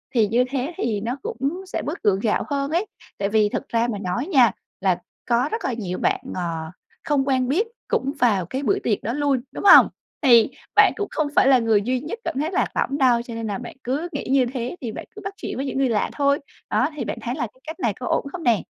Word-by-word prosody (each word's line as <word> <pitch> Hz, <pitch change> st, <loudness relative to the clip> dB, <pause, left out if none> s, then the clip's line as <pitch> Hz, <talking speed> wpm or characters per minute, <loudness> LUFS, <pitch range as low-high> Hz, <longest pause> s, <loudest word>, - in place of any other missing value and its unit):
thì 220 Hz, -3 st, +4 dB
như 235 Hz, +4 st, +3 dB
thế 275 Hz, +5 st, -2 dB
thì 215 Hz, -4 st, -1 dB
nó 240 Hz, +5 st, -3 dB
cũng 285 Hz, +9 st, -3 dB
sẽ -, -, -3 dB
bớt 300 Hz, +5 st, -5 dB
gượng 195 Hz, -2 st, +3 dB
gạo 210 Hz, 0 st, +1 dB
hơn 280 Hz, 0 st, -1 dB
ấy. 345 Hz, +6 st, +1 dB, 0.3 s
Tại 200 Hz, 0 st, -1 dB
vì 210 Hz, -1 st, +3 dB
thực -, -, -4 dB
ra 230 Hz, +1 st, +1 dB
mà 205 Hz, -, -3 dB
nói 205 Hz, -, -2 dB
nha 260 Hz, -, +5 dB, 0.3 s
là 185 Hz, -3 st, +1 dB, 0.3 s
có 245 Hz, +5 st, +2 dB
rất 450 Hz, -, -3 dB
là 250 Hz, -, 0 dB
nhiều 190 Hz, -6 st, -4 dB
bạn, -, -, +1 dB, 0.2 s
ờ, 180 Hz, -, -2 dB, 0.6 s
không 280 Hz, -2 st, +1 dB
quen 255 Hz, -2 st, +2 dB
biết 385 Hz, -, +1 dB, 0.2 s
cũng 275 Hz, +1 st, 0 dB
vào 210 Hz, -7 st, +3 dB
cái 260 Hz, -, -4 dB
buổi 225 Hz, -, +2 dB
tiệc 210 Hz, -4 st, 0 dB
đó 230 Hz, -, -2 dB
luôn, 280 Hz, -3 st, +1 dB
đúng -, -, -7 dB
hông? 405 Hz, -, +9 dB, 0.3 s
Thì 240 Hz, -6 st, +6 dB, 0.3 s
bạn -, -, +6 dB
cũng 410 Hz, -, -2 dB
không 310 Hz, -, 0 dB
phải -, -, +5 dB
là 265 Hz, -2 st, +6 dB
người 225 Hz, -3 st, +3 dB
duy 250 Hz, +4 st, 0 dB
nhất 320 Hz, -, -6 dB
cảm -, -, -3 dB
thấy 310 Hz, +4 st, -1 dB
lạc -, -, +1 dB
lõng 280 Hz, -, 0 dB
đâu, 250 Hz, -4 st, +4 dB
cho 235 Hz, 0 st, -8 dB
nên 230 Hz, -1 st, -4 dB
là 200 Hz, -, -2 dB
bạn 245 Hz, -, -8 dB
cứ 280 Hz, +7 st, -2 dB
nghĩ -, -, -4 dB
như 270 Hz, -2 st, +4 dB
thế 250 Hz, +4 st, -3 dB
thì 230 Hz, -3 st, -4 dB
bạn -, -, -7 dB
cứ 415 Hz, -, -8 dB
bắt 395 Hz, -, -4 dB
chuyện -, -, -5 dB
với 270 Hz, -, -2 dB
những 270 Hz, -, -3 dB
người 270 Hz, -2 st, +2 dB
lạ 215 Hz, -3 st, +1 dB
thôi. 280 Hz, 0 st, +2 dB, 0.3 s
Đó, -, -, +2 dB
thì -, -, -3 dB
bạn -, -, -4 dB
thấy 240 Hz, +1 st, -3 dB
là 245 Hz, -6 st, -2 dB
cái 255 Hz, -, -27 dB
cách 320 Hz, +1 st, -6 dB
này 230 Hz, -4 st, +1 dB
có 245 Hz, +5 st, -7 dB
ổn -, -, +1 dB
không 345 Hz, 0 st, -6 dB
nè? 230 Hz, -, +3 dB
255 Hz, 260 wpm, -23 LUFS, 225-285 Hz, 0.6 s, hông